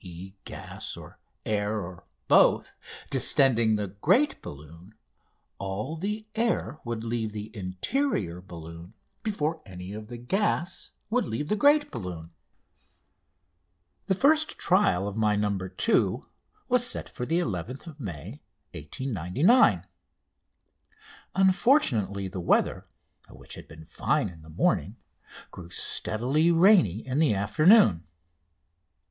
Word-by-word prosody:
e._ 90 Hz, +1 st, -9 dB
gas -, -, -7 dB
or -, -, -13 dB, 0.3 s
air, 105 Hz, 0 st, -1 dB
or 90 Hz, -2 st, -8 dB, 0.2 s
both) -, -, +4 dB, 0.4 s
distending 115 Hz, -5 st, +4 dB
the 105 Hz, -2 st, -3 dB
great 185 Hz, -, +1 dB
balloon, 80 Hz, +8 st, -12 dB, 0.6 s
all 100 Hz, +10 st, -4 dB
the 210 Hz, +6 st, -4 dB
air 225 Hz, -, -1 dB
would 115 Hz, -2 st, -4 dB
leave 115 Hz, -2 st, -3 dB
the 105 Hz, +2 st, -7 dB
interior 95 Hz, -, -2 dB
balloon 85 Hz, +2 st, -11 dB, 0.3 s
before 160 Hz, -7 st, -2 dB
any 90 Hz, -1 st, -9 dB
of 105 Hz, 0 st, -8 dB
the 120 Hz, +1 st, -8 dB
gas 175 Hz, -, -1 dB, 0.2 s
would 250 Hz, +1 st, +1 dB
leave 145 Hz, +7 st, -4 dB
the 210 Hz, -, +2 dB
great 290 Hz, +6 st, +4 dB
balloon. 90 Hz, -, -7 dB, 1.8 s
The 190 Hz, -, +2 dB
first 310 Hz, +8 st, +3 dB
trial 170 Hz, -, +2 dB
of 100 Hz, +1 st, -5 dB
my 105 Hz, -1 st, +2 dB
"No. 105 Hz, -1 st, 0 dB
2" 95 Hz, -, 0 dB, 0.4 s
was 250 Hz, -1 st, +3 dB
set 245 Hz, -, 0 dB
for -, -, -7 dB
11th 140 Hz, -, -3 dB
May 100 Hz, -, -7 dB, 0.3 s
1899. 130 Hz, -, +2 dB, 1.5 s
Unfortunately, 185 Hz, -, +2 dB
the 95 Hz, 0 st, -6 dB
weather, 85 Hz, -, +1 dB, 0.4 s
which -, -, -11 dB
had -, -, -9 dB
been 80 Hz, +1 st, -13 dB
fine -, -, -1 dB
in 85 Hz, -3 st, -14 dB
the 80 Hz, -, -15 dB
morning, 80 Hz, -, 0 dB, 0.6 s
grew 85 Hz, -2 st, -10 dB
steadily 125 Hz, -, +1 dB
rainy 165 Hz, -, +4 dB
in 130 Hz, +2 st, -1 dB
the 150 Hz, -10 st, +3 dB
afternoon. 105 Hz, -, +4 dB
110 Hz, 120 wpm, -27 LUFS, -, 1.8 s, both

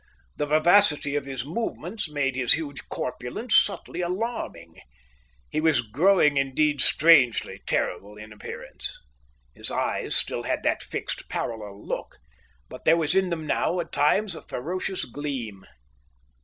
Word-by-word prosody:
The 150 Hz, -, -2 dB
vivacity 155 Hz, -2 st, +5 dB
of 145 Hz, -2 st, -1 dB
his 135 Hz, -3 st, -5 dB
movements 180 Hz, +1 st, -4 dB
made 140 Hz, -3 st, -1 dB
his 125 Hz, -2 st, +4 dB
huge 145 Hz, -3 st, -5 dB
corpulence 125 Hz, -, -3 dB
subtly 180 Hz, -, +2 dB
alarming. 180 Hz, -, -4 dB, 0.7 s
He 155 Hz, -, 0 dB
was 160 Hz, -5 st, +3 dB
growing 150 Hz, -, +3 dB
indeed 140 Hz, +1 st, +1 dB
strangely 145 Hz, -7 st, +4 dB
terrible 100 Hz, +4 st, -2 dB
in 105 Hz, 0 st, -10 dB
appearance. 105 Hz, -, -8 dB, 0.6 s
His -, -, +2 dB
eyes -, -, -1 dB
had -, -, -3 dB
still -, -, +1 dB
that -, -, -1 dB
fixed, -, -, -5 dB
parallel 105 Hz, -3 st, -5 dB
look, -, -, -5 dB, 0.5 s
but -, -, -11 dB
there 165 Hz, -, +5 dB
was 160 Hz, -1 st, +1 dB
in 190 Hz, -1 st, +2 dB
them 165 Hz, -2 st, -3 dB
now 175 Hz, +3 st, 0 dB
at 170 Hz, -, -4 dB
times 195 Hz, +7 st, +2 dB
a -, -, -8 dB
ferocious 185 Hz, +7 st, -3 dB
gleam. 125 Hz, -7 st, -6 dB
150 Hz, 140 wpm, -25 LUFS, 125-175 Hz, 0.7 s, vivacity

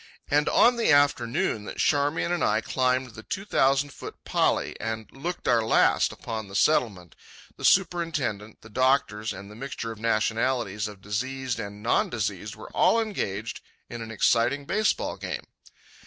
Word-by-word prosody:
And 145 Hz, +1 st, +3 dB
on 245 Hz, 0 st, +5 dB
the 230 Hz, -, +3 dB
afternoon 145 Hz, -, +2 dB
that -, -, -7 dB
Charmian 145 Hz, +3 st, +1 dB
and 175 Hz, -2 st, 0 dB
I -, -, +3 dB
climbed 130 Hz, -1 st, 0 dB
the 110 Hz, -, -10 dB
two 195 Hz, -, -5 dB
thousand 135 Hz, -6 st, +2 dB
foot -, -, -9 dB
pali -, -, +1 dB
and 110 Hz, -1 st, -4 dB
looked 175 Hz, +6 st, -5 dB
our 120 Hz, -2 st, +4 dB
last 110 Hz, -, +3 dB
upon 110 Hz, -2 st, -6 dB
the 95 Hz, -, -10 dB
Settlement, 100 Hz, -, +1 dB, 0.4 s
the -, -, -12 dB
superintendent, 160 Hz, -, +1 dB
the 110 Hz, -, -14 dB
doctors, 130 Hz, -3 st, +1 dB
and 100 Hz, +2 st, -9 dB
the -, -, -11 dB
mixture 115 Hz, -2 st, -5 dB
of 110 Hz, -, -9 dB
nationalities 115 Hz, -1 st, 0 dB
and 105 Hz, -, -8 dB
of -, -, -27 dB
diseased 130 Hz, +4 st, -3 dB
and 105 Hz, -1 st, -7 dB
non 115 Hz, -, +2 dB
diseased 105 Hz, -2 st, -3 dB
were -, -, -11 dB
all 230 Hz, -, +4 dB
engaged 115 Hz, -, -3 dB, 0.3 s
in 120 Hz, -, -6 dB
an 115 Hz, -, -7 dB
exciting 120 Hz, +5 st, +2 dB
baseball 210 Hz, +7 st, 0 dB
game. -, -, -5 dB
120 Hz, 165 wpm, -26 LUFS, 110-145 Hz, 0.4 s, on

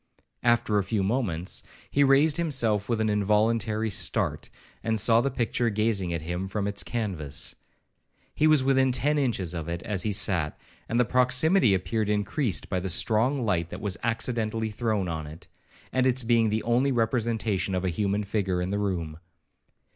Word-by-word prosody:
After 120 Hz, -3 st, +2 dB
a -, -, 0 dB
few 100 Hz, 0 st, -1 dB
moments, 95 Hz, -6 st, -1 dB, 0.3 s
he 140 Hz, -, +3 dB
raised 140 Hz, +2 st, +4 dB
himself 120 Hz, -, 0 dB
with 115 Hz, -2 st, 0 dB
an 110 Hz, -, +1 dB
involuntary 110 Hz, +1 st, +1 dB
start, -, -, -1 dB, 0.3 s
and 110 Hz, 0 st, 0 dB
saw 115 Hz, +3 st, +4 dB
the 140 Hz, -, 0 dB
picture 120 Hz, -2 st, 0 dB
gazing 105 Hz, -4 st, 0 dB
at 85 Hz, -2 st, -3 dB
him 90 Hz, +3 st, -3 dB
from 100 Hz, +1 st, -2 dB
its 100 Hz, 0 st, -2 dB
canvas. 90 Hz, -, -4 dB, 0.8 s
He 155 Hz, -, +2 dB
was 155 Hz, -4 st, +4 dB
within 130 Hz, -1 st, +3 dB
ten 145 Hz, +4 st, +1 dB
inches 105 Hz, -, -1 dB
of 80 Hz, -2 st, -5 dB
it 85 Hz, +1 st, -4 dB
as 100 Hz, -4 st, -2 dB
he 105 Hz, -, -1 dB
sat, 95 Hz, -6 st, 0 dB, 0.3 s
and 115 Hz, -, +1 dB
the 125 Hz, -, +4 dB
proximity 125 Hz, -, +3 dB
appeared 105 Hz, +3 st, -1 dB
increased 105 Hz, -, 0 dB
by 95 Hz, -, -1 dB
the 95 Hz, +1 st, -4 dB
strong 115 Hz, -, +2 dB
light 85 Hz, -5 st, 0 dB
that -, -, -7 dB
was 100 Hz, -3 st, -1 dB
accidentally 115 Hz, -1 st, -1 dB
thrown 105 Hz, -3 st, -1 dB
on 80 Hz, -2 st, -4 dB
it, 80 Hz, +2 st, -12 dB, 0.5 s
and 130 Hz, 0 st, +2 dB
its 130 Hz, 0 st, +1 dB
being 115 Hz, -1 st, +3 dB
the 110 Hz, +1 st, -1 dB
only 125 Hz, +4 st, +2 dB
representation 115 Hz, -5 st, 0 dB
of 90 Hz, 0 st, -2 dB
a -, -, +1 dB
human 100 Hz, +3 st, -1 dB
figure 100 Hz, -3 st, -1 dB
in 90 Hz, +1 st, -2 dB
the 100 Hz, -, -1 dB
room. 85 Hz, -6 st, -3 dB
110 Hz, 175 wpm, -26 LUFS, 95-120 Hz, 0.8 s, raised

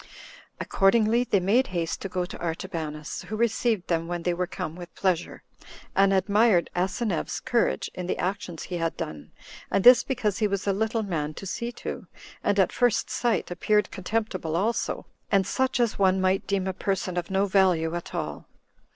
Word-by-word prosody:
Accordingly, 220 Hz, +4 st, +3 dB
they 200 Hz, -, +2 dB
made 210 Hz, +8 st, +3 dB
haste 170 Hz, -3 st, -2 dB
to 195 Hz, -, -4 dB
go 180 Hz, -1 st, -1 dB
to 180 Hz, -, -9 dB
Artabanus, 160 Hz, -3 st, -4 dB
who 215 Hz, -, -4 dB
received 225 Hz, -3 st, +1 dB
them 165 Hz, -1 st, 0 dB
when 175 Hz, -1 st, -3 dB
they 175 Hz, -, +1 dB
were 180 Hz, +1 st, -1 dB
come 160 Hz, -1 st, -5 dB
with 175 Hz, -1 st, -10 dB
pleasure, 185 Hz, -3 st, -1 dB, 0.5 s
and 195 Hz, 0 st, +5 dB
admired 200 Hz, 0 st, +3 dB
Asineus's 190 Hz, +1 st, -1 dB
courage 240 Hz, -1 st, 0 dB
in 180 Hz, -1 st, -5 dB
the -, -, -1 dB
actions 180 Hz, -3 st, -3 dB
he 180 Hz, -, -4 dB
had 165 Hz, -1 st, -2 dB
done, 75 Hz, -2 st, -6 dB, 0.4 s
and 195 Hz, -, +1 dB
this 250 Hz, 0 st, +9 dB
because 230 Hz, -6 st, -1 dB
he 215 Hz, -, +3 dB
was 200 Hz, -1 st, -2 dB
a 200 Hz, -, +2 dB
little 220 Hz, +2 st, 0 dB
man 155 Hz, -6 st, -3 dB
to -, -, -8 dB
see 235 Hz, +5 st, -3 dB
to, -, -, -6 dB, 0.4 s
and 205 Hz, -, +1 dB
at 190 Hz, -, +4 dB
first 240 Hz, -2 st, +1 dB
sight 230 Hz, -7 st, 0 dB
appeared 210 Hz, +3 st, +1 dB
contemptible 190 Hz, -4 st, -2 dB
also, 215 Hz, +7 st, -1 dB, 0.3 s
and 195 Hz, -2 st, +4 dB
such 260 Hz, +5 st, 0 dB
as 235 Hz, -4 st, +1 dB
one 190 Hz, -1 st, +4 dB
might 190 Hz, +1 st, +1 dB
deem 195 Hz, -1 st, 0 dB
a 190 Hz, -, -1 dB
person 190 Hz, -1 st, -2 dB
of 175 Hz, -1 st, -2 dB
no 195 Hz, +1 st, +2 dB
value 185 Hz, -5 st, +3 dB
at 175 Hz, 0 st, -5 dB
all. -, -, -4 dB
190 Hz, 185 wpm, -26 LUFS, 175-215 Hz, 0.5 s, this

